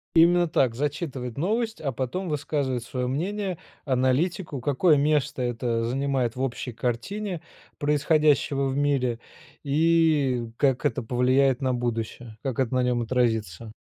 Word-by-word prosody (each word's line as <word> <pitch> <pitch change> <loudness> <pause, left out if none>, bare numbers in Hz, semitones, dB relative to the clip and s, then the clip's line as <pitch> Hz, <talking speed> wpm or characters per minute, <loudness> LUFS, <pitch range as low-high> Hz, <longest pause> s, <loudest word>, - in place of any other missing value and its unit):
Именно 175 +1 +5
так: 130 -6 +1
зачитывает 135 -3 -3
новость, 220 +5 -1
а 140 -3 -1
потом 135 +9 -3
высказывает 140 -4 -1
свое 125 +1 -3
мнение, 185 +7 -2 0.3
аналитику, 135 +3 0
какое 150 +5 +3
место 145 -2 +1
это 120 -1 -1
занимает 130 -2 -1
в 130 - -4
общей 125 -1 -3
картине 165 - -3 0.4
происходящего 150 -1 +2
в 135 - -2
мире, 135 -5 +1 0.4
и 145 -5 +2
как 135 0 +1
это 125 - +1
повлияет 130 +3 +2
на 130 -1 +1
будущее, 115 -1 -4
как 135 -2 -3
это 130 -1 0
на 125 - +2
нем 125 -1 +1
отразится. 110 -4 -1
135 Hz, 135 wpm, -25 LUFS, 125-150 Hz, 0.4 s, Именно